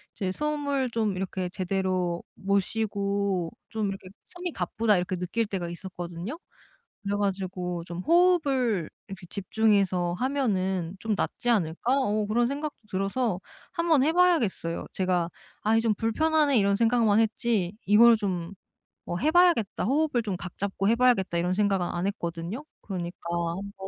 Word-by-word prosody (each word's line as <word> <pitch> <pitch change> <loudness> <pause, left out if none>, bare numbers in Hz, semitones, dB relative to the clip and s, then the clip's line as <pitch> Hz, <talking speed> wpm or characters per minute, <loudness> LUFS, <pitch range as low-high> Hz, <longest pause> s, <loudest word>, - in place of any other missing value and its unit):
이제 190 -3 -2
숨을 285 0 -1
좀 220 -4 0
이렇게 185 -1 -3
제대로 185 -2 -1
못 200 0 +1
쉬고 200 -4 -1 0.2
좀 215 -2 -1
이렇게 195 -1 -7 0.2
'숨이 355 0 -5
가쁘다.' 210 +3 +1
이렇게 180 +1 -1
느낄 180 +6 -1
때가 185 -4 -4
있었거든요. 175 - -6 0.7
그래 200 0 -1
가지고 185 -3 -2
좀 175 0 -6
'호흡을 280 - +3 0.2
이렇게 190 -2 -9
집중해서 195 -3 +1
하면은 190 -10 0
좀 220 -1 0
낫지 245 - -2
않을까?' 220 +4 +1
어 215 -4 0
그런 235 +3 +2
생각도 290 +1 -4
들어서 195 +1 -1 0.3
한번 335 -5 +3
해 315 - +3
봐야겠어요. 315 - +2
제가 180 -2 0 0.3
'아이 225 +1 +3
좀 225 -2 +1
불편하네.' 290 +4 +2
이런 200 0 +3
생각만 225 -1 +3
했지 220 -4 +1
'이걸 230 +3 +7
좀 185 -4 -3 0.5
뭐 175 - -3
해 300 - +1
봐야겠다. 350 - +3
호흡을 275 0 +2
좀 200 -5 -3
각 180 -1 -8
잡고 195 0 -1
해 230 - +4
봐야겠다.' 235 -8 +3
이런 180 +1 0
생각은 195 -3 +2
안 175 +2 -2
했거든요. 175 - -4 0.2
그러니까 180 -3 -5
한번 190 +3 -3
200 Hz, 325 characters per minute, -27 LUFS, 185-235 Hz, 0.7 s, 이걸